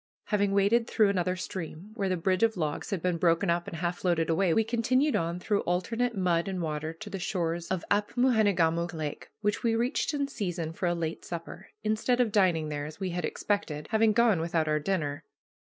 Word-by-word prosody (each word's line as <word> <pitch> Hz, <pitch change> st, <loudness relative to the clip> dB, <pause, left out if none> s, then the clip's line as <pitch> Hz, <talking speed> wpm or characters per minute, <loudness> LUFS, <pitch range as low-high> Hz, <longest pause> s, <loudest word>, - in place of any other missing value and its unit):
Having 205 Hz, -2 st, +2 dB
waded 210 Hz, +4 st, +3 dB
through 215 Hz, -3 st, +4 dB
another 180 Hz, -2 st, 0 dB
stream, 180 Hz, +1 st, -6 dB
where 200 Hz, -4 st, -1 dB
the 185 Hz, -, 0 dB
bridge 185 Hz, +2 st, +1 dB
of 225 Hz, -3 st, +3 dB
logs 155 Hz, -3 st, -2 dB
had 195 Hz, -6 st, -3 dB
been 180 Hz, -2 st, 0 dB
broken 170 Hz, +2 st, +3 dB
up 170 Hz, 0 st, -1 dB
and 165 Hz, -, -5 dB
half 175 Hz, +1 st, -2 dB
floated 170 Hz, -3 st, +1 dB
away, 175 Hz, +2 st, +2 dB
we 225 Hz, -, +3 dB
continued 245 Hz, +6 st, +1 dB
on 170 Hz, +1 st, -1 dB
through 205 Hz, +2 st, 0 dB
alternate 230 Hz, +7 st, -1 dB
mud 175 Hz, -2 st, +1 dB
and 190 Hz, -1 st, -3 dB
water 155 Hz, -1 st, -2 dB
to 165 Hz, +6 st, -10 dB
the 195 Hz, -1 st, -5 dB
shores 170 Hz, -3 st, -2 dB
of 190 Hz, -3 st, -2 dB
Apmoojenegamook 205 Hz, -7 st, +2 dB
Lake, 155 Hz, -2 st, -5 dB
which 210 Hz, -1 st, 0 dB
we 230 Hz, -1 st, +2 dB
reached 245 Hz, +7 st, 0 dB
in 280 Hz, -1 st, 0 dB
season 175 Hz, -, -3 dB
for 180 Hz, -, -2 dB
a 175 Hz, -, +1 dB
late 165 Hz, -1 st, -3 dB
supper, 170 Hz, -1 st, -7 dB
instead 220 Hz, +3 st, +1 dB
of 240 Hz, -3 st, +3 dB
dining 175 Hz, -7 st, +2 dB
there, 145 Hz, -1 st, -3 dB
as 155 Hz, +2 st, -11 dB
we 190 Hz, -2 st, -2 dB
had 175 Hz, +1 st, -2 dB
expected, 155 Hz, -8 st, -2 dB
having 220 Hz, 0 st, +4 dB
gone 215 Hz, -5 st, +3 dB
without 165 Hz, -1 st, 0 dB
our 150 Hz, 0 st, +2 dB
dinner. 150 Hz, -4 st, -2 dB
185 Hz, 205 wpm, -29 LUFS, 165-210 Hz, -, through